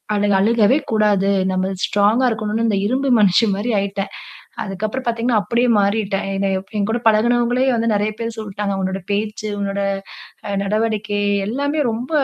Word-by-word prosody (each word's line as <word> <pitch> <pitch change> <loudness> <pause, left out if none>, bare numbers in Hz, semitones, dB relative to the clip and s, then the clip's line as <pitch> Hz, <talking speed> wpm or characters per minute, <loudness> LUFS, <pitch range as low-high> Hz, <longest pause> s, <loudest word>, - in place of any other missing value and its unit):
அழுக் 205 -1 +2
அழுகவே 230 +4 +3
கூடாது. 210 -3 +2 0.2
நம்ம 185 +1 -1
ஸ்ட்ராங்கா 210 +5 +2
இருக்கனும்ன்னு, 215 0 -1
இந்த 205 - +1
இரும்பு 265 +5 0
மனுஷி 205 +2 +4
மாரி 220 +5 -2
ஆயிட்டேன். 195 0 -3 0.5
அதுக்கு 195 +1 -3
அப்புறம் 260 +4 -5
பாத்தீங்கன்னா, 230 -1 +1
அப்படியே 240 +3 +1
மாறிட்டேன். 200 -1 0
என்ன 195 0 0
எப் 190 +2 -13
என் 200 - 0
கூட 235 +2 -1
பழகுனவங்களே 240 +3 +2
வந்து 230 -1 +1
நெறையா 210 +1 0
பேர் 230 0 -4
சொல்டாங்க. 205 -2 -3
"உன்னோட 190 0 -3
பேச்சு, 215 +1 -2
உன்னோட 200 0 -2 0.7
அ, - - -4
நடவடிக்கை 215 0 -1 0.3
எல்லாமே 285 +6 -1
ரொம்ப 240 +6 -5
215 Hz, 155 wpm, -19 LUFS, 200-230 Hz, 0.7 s, மனுஷி